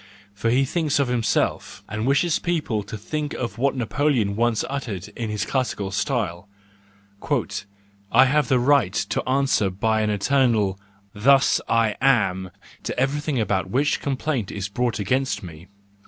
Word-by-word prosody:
For 100 +3 -1
he 130 +4 +3
thinks 155 0 0
of 140 -3 +1
himself, 120 -2 -1
and 110 +3 -3
wishes 150 +4 +2
people 160 -11 -1
to 100 +2 -7
think 150 +7 -4
of 120 -4 -3
him - - -19
what 140 0 +2
Napoleon 120 -4 0
once 115 0 +1
uttered 115 -10 -5
in 115 -2 -5
his 105 -1 -2
classical 110 -7 -2
style—" 100 -3 -2 1.6
I 130 - +7
have 150 +3 +2
the 130 - +3
right 125 -6 +3
to - - -2
answer 135 -6 +2
by 110 +4 0
an 105 - 0
eternal 105 -2 +1 0.2
' 100 -1 -35
thus 140 0 +5
I 115 -2 +2
am 105 -8 +2
1 90 - -12 0.3
to - - -3
everything 145 +1 0
about 95 -3 0
which 140 +8 +1
complaint 135 -5 -2
is 100 -1 -4
brought 120 +3 -1
against 130 +6 -1
me. 85 0 -10
120 Hz, 160 wpm, -23 LUFS, 100-135 Hz, 1.6 s, I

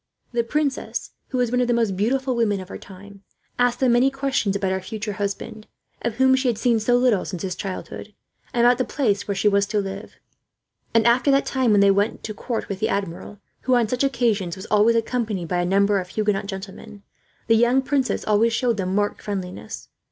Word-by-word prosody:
The 235 -1 0
princess, 285 +2 -2 0.2
who 255 - -3
was 245 -2 +1
one 250 0 +2
of 245 - +1
the 240 - +2
most 225 -5 +1
beautiful 255 +6 0
women 215 -4 +1
of 185 0 -9
her - - -7
time, 200 +1 -13 0.4
asked 245 0 +2
them 260 -2 +3
many 245 +3 +4
questions 270 -7 -1
about 195 -1 -1
her 190 0 -1
future 210 +2 -5
husband, 205 +2 -5 0.3
of 235 -2 -2
whom 260 +1 +4
she 260 0 0
had 235 -3 +1
seen 230 0 +2
so 245 +3 +2
little 245 -6 +2
since 180 -1 -6
his 185 -1 -2
childhood, 195 +2 -7 0.4
and 240 0 +2
about 245 +1 +4
the - - +3
place 220 -5 -1
where 200 - -1
she 210 - +1
was 200 0 +3
to 215 0 -2
live; 195 +1 -6 0.8
and 230 -1 +4
after 245 +4 +4
that 275 0 +3
time, 260 -3 0
when 205 -2 +5
they 200 0 +6
went 205 +3 0
to 215 - -5
court 230 +2 -4
with 195 -2 -5
the - - 0
Admiral, 200 +1 -4 0.2
who 255 0 +3
on 235 -2 +2
such 250 +4 -1
occasions 225 -9 0
was 190 +1 -9
always 215 +2 +4
accompanied 225 -6 -1
by 175 +2 -1
a - - 0
number 200 +2 +2
of 180 -1 -6
Huguenot 210 -1 -1
gentlemen, 200 +1 -8 0.4
the 225 - +4
young 240 +4 +3
princess 270 -2 -1
always 220 +2 +3
showed 235 -2 +1
them 185 -1 -2
marked 205 0 0
friendliness. 190 -3 -6
215 Hz, 220 wpm, -23 LUFS, 200-245 Hz, 0.8 s, they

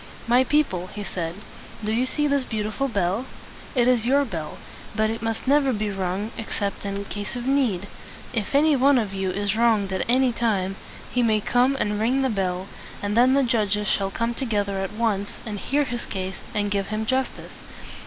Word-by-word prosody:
"My 245 +2 +5
people," 260 -11 +1
he 205 +2 -7
said, 170 -3 -4 0.5
"do 215 - -1
you 245 +3 +1
see 295 +3 0
this 280 -2 +2
beautiful 220 +4 -2
bell? 200 +2 0 0.5
It 245 -1 +4
is 240 -2 +3
your 280 +2 +4
bell; 165 - -5 0.4
but 220 0 +2
it 225 - -4
must 225 +2 -3
never 280 -1 +4
be 215 -3 -1
rung 195 +3 -2
except 205 -3 -3
in 200 0 -3
case 205 +3 -5
of 245 0 -4
need. 255 -9 +1 0.5
If 225 +2 -2
any 300 +1 +5
one 275 +1 +5
of 210 -5 -1
you 190 -1 -1
is 200 +2 -1
wronged 220 -4 +3
at 190 - 0
any 255 +1 +4
time, 200 -5 0 0.4
he 250 - +1
may 220 -2 +3
come 245 +5 +2
and 210 0 0
ring 255 +5 +2
the 265 - +1
bell; 185 -2 -1 0.4
and 205 +1 -1
then 250 +3 +5
the 280 - +4
judges 210 -4 +1
shall 195 -1 +1
come 230 +4 -1
together 205 -6 -1
at 195 +1 -3
once, 210 -3 -1
and 210 -3 -4
hear 290 +7 +1
his 240 -3 -4
case, 190 -1 -4 0.2
and 205 -1 0
give 200 -1 0
him 215 +1 -2
justice. 260 +3 -1
220 Hz, 195 wpm, -24 LUFS, 200-250 Hz, 0.5 s, My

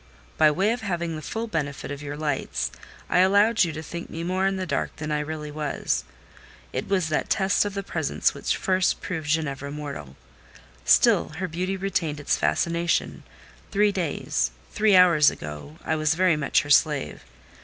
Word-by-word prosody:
By 155 - +5
way 190 +8 +1
of 245 - -2
having 170 -5 -2
the 155 - -6
full 225 +8 -4
benefit 145 -10 -3
of 145 0 -6
your 145 0 -6
lights, 150 -3 -2 0.4
I - - +2
allowed 205 +4 +5
you 170 - -1
to 155 +1 -6
think 170 +2 -7
me 165 - -5
more 185 +2 +1
in 195 - 0
the 185 - -2
dark 140 -5 -2
than 155 0 -5
I 150 - +1
really 150 0 -5
was. 150 -1 -2 0.7
It - - -3
was 185 -5 +1
that 155 - -1
test 195 0 +2
of 205 -1 -4
the 200 - -3
presents - - 0
which - - -1
first 185 -1 +1
proved 160 -4 -5
Ginevra 140 -3 -1
mortal. 140 - -7 0.7
Still - - +5
her 185 +1 -2
beauty 185 +4 -2
retained 175 -6 -2
its 145 - +1
fascination: 170 0 0 0.5
three 210 0 +3
days—three 170 - 0
hours 170 -5 +7
ago, 75 0 -8
I 160 - +1
was 155 0 +1
very 180 -1 +3
much 150 -2 +1
her 145 - -5
slave. 145 - +2
160 Hz, 175 wpm, -25 LUFS, 150-185 Hz, 0.7 s, hours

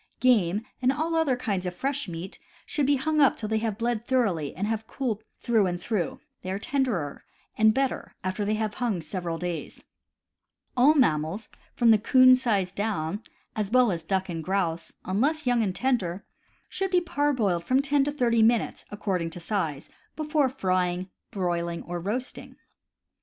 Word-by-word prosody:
Game, 215 -5 +3 0.2
and 255 +1 +4
all 315 +4 -1
other 320 -5 +2
kinds 200 -7 -2
of 180 - -4
fresh 280 +2 -2
meat, 170 +2 -7 0.3
should 290 -3 0
be 285 - +4
hung 305 +3 +1
up 275 - +5
till 215 - -4
they 220 0 +1
have 220 -2 -2
bled 230 -1 -1
thoroughly 205 - +1
and 190 +6 -2
have 220 0 -2
cooled 225 -6 -3
through 225 -5 +2
and 175 -1 -2
through 185 -3 -2
— - - -53
they 185 - -6
are 190 - -1
tenderer 220 - -1 0.3
and 220 0 +5
better 265 +3 -2
after 185 +3 -2
they 210 +1 +1
have 215 -1 -2
hung 230 -7 -1
several 170 +1 -4
days. 175 -1 -5 0.9
All 275 +5 +6
mammals 165 - +1 0.3
from 235 -2 +5
the 220 - +5
'coon 255 +4 +7
size 205 -8 0
down, 200 -2 -2 0.3
as 210 -3 -1
well 250 -1 +4
as 170 -2 -2
duck 190 +3 -1
and 165 -3 -4
grouse, 175 -2 -1
unless 280 +11 0
young 245 -2 +3
and 190 -4 -1
tender, 205 -8 -1 0.4
should 385 0 -2
be 365 -1 +4
parboiled 285 - 0
from 255 +8 +2
ten 280 0 +2
to 290 - 0
thirty 240 -5 +2
minutes, 230 +1 +2
according 190 -5 -2
to 165 - -8
size, 165 -6 -2 0.3
before 300 -3 +1
frying, 185 -6 -1 0.2
broiling, 170 -3 -2
or 175 0 -4
roasting. 225 +9 -4
215 Hz, 175 wpm, -27 LUFS, 180-255 Hz, 0.9 s, coon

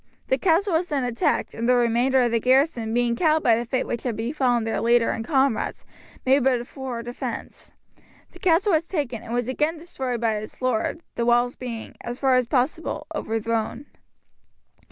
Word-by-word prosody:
The - - +2
castle 370 +2 +2
was 335 +2 +1
then 285 -5 -1
attacked, 240 -1 0
and 230 +2 -2
the 250 - +5
remainder 245 +2 +3
of 240 - +1
the 230 - +2
garrison 255 -2 +2
being 240 0 +1
cowed 315 +3 +2
by 230 - +5
the 235 +2 -2
fate 255 +2 -1
which 235 - -3
had 245 -4 -2
befallen 245 +1 0
their 225 - -1
leader 235 0 +3
and 225 - -3
comrades, 270 -2 0 0.4
made 265 +1 +4
but 255 -2 +3
a 240 - -6
poor 255 -3 -6
defence. 240 +1 -6 0.6
The - - -15
castle 370 +3 +3
was 320 +1 +1
taken, 280 - -3
and 230 - -9
was 245 0 -1
again 300 +5 0
destroyed 265 -7 -4
by 225 -2 +1
its 215 +1 -8
lord, 255 +5 -1
the 235 - -1
walls 240 +1 +3
being, 235 -3 -7
as 240 +1 -5
far 265 -1 +2
as 255 -2 +3
possible, 270 +6 -1
overthrown. 225 +3 -2
245 Hz, 190 wpm, -24 LUFS, 235-280 Hz, 0.6 s, the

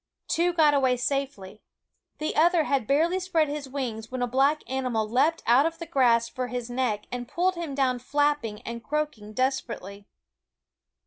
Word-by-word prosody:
Two 345 +2 +2
got 315 -4 +4
away 260 -3 +2
safely; 245 -7 -3 0.6
the 310 - -3
other 335 +1 +4
had 275 -7 0
barely 330 +6 +2
spread 340 -4 +1
his 290 -2 -5
wings 235 -5 -4
when 255 -1 -3
a - - 0
black 275 +5 +2
animal 250 -5 -1
leaped 270 +9 +1
out 255 +6 +5
of 330 0 -5
the 335 - -6
grass 245 -7 +3
for 255 +1 -4
his 245 0 -5
neck 245 -5 -1
and 245 -1 -4
pulled 360 +7 +1
him 335 -6 -5
down 255 -3 +1
flapping 290 -5 0
and 235 0 -6
croaking 295 -8 -3
desperately. 220 -5 -3
265 Hz, 170 wpm, -26 LUFS, 235-300 Hz, 0.6 s, out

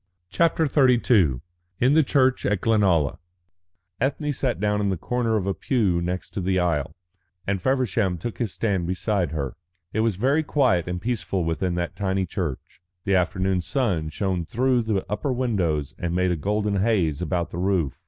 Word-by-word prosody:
CHAPTER 165 -1 +2
XXXII 120 - +3 0.4
IN 130 +3 +4
THE 160 - +6
CHURCH 130 -2 +2
AT 100 -1 +1
GLENALLA 95 -10 +2 0.8
Ethne 145 +3 0
sat 130 -2 -1
down 105 0 +1
in 100 - +1
the 95 - -1
corner 115 +4 0
of 95 - -2
a 100 - 0
pew 95 -4 0
next 90 +1 -4
to 100 - -3
the 95 +1 0
aisle, 85 -6 0 0.5
and 95 -2 -1
Feversham 115 -7 +1
took 110 +7 -6
his 115 -6 -1
stand 95 -6 -1
beside 95 -1 0
her. 70 -4 -3 0.4
It 110 - -1
was 110 -2 +1
very 135 - +2
quiet 130 - +1
and 90 0 -3
peaceful 100 -4 -2
within 85 +2 -1
that 85 0 -3
tiny 95 -1 -1
church. 85 -5 -5 0.2
The 100 - 0
afternoon 95 0 +1
sun 90 - -1
shone 95 +1 -1
through 125 +7 +1
the 110 -4 -1
upper 130 +7 -2
windows 95 - -1
and 85 0 -2
made 90 0 +2
a - - +1
golden 105 +5 -1
haze 95 -7 +1
about 85 -1 -1
the 85 - -5
roof. 90 -6 0
95 Hz, 175 wpm, -24 LUFS, 90-120 Hz, 0.8 s, THE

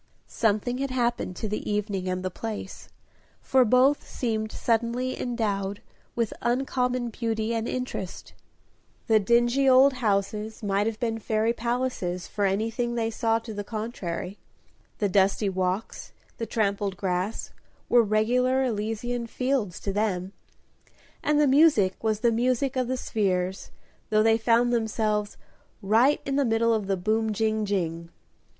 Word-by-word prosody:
Something 225 +3 0
had 275 0 -1
happened 240 -7 -1
to 215 - -4
the 210 +1 -4
evening 200 -3 -2
and 185 0 -3
the 185 - -2
place, 215 -1 -6 0.5
for 260 -1 +3
both 255 +5 +3
seemed 220 -3 -2
suddenly 235 +2 -1
endowed 205 -5 -2 0.4
with 230 -2 -1
uncommon 250 -1 0
beauty 225 -1 -2
and 225 0 -1
interest. 250 -7 -5 0.7
The 220 -2 +4
dingy 240 +5 +3
old 265 +2 +6
houses 215 -2 -1
might 200 +1 +1
have 225 -1 -3
been 225 -3 -1
fairy 220 +1 0
palaces, 235 -7 -2
for 205 -1 -1
anything 225 +5 -1
they 225 -1 -1
saw 225 0 +1
to 230 -1 -7
the 205 0 -4
contrary; 200 -4 -5 0.6
the 205 - +1
dusty 195 +1 +2
walks, 185 +2 -3 0.3
the 230 - -3
trampled 200 -3 -1
grass, 185 +3 -2 0.4
were 240 - +5
regular 245 +5 +2
Elysian 230 +1 -2
fields 250 -7 -1
to 195 - -3
them, 195 -2 -1 0.9
and 300 0 +2
the 300 - +5
music 270 - +4
was 215 -1 0
the 235 - +3
music 255 +3 0
of 255 -2 0
the 260 +1 -1
spheres, 190 -5 -1 0.4
though 215 0 +3
they 225 0 +4
found 235 +2 +3
themselves 215 -2 -1 0.4
"Right 230 +9 +3
in 275 0 -1
the 285 - +3
middle 230 -1 +2
of 215 -3 -1
the 195 -1 0
boom, 220 +4 0
jing, 220 0 0
jing." 170 -4 -2
225 Hz, 145 wpm, -26 LUFS, 205-240 Hz, 0.9 s, old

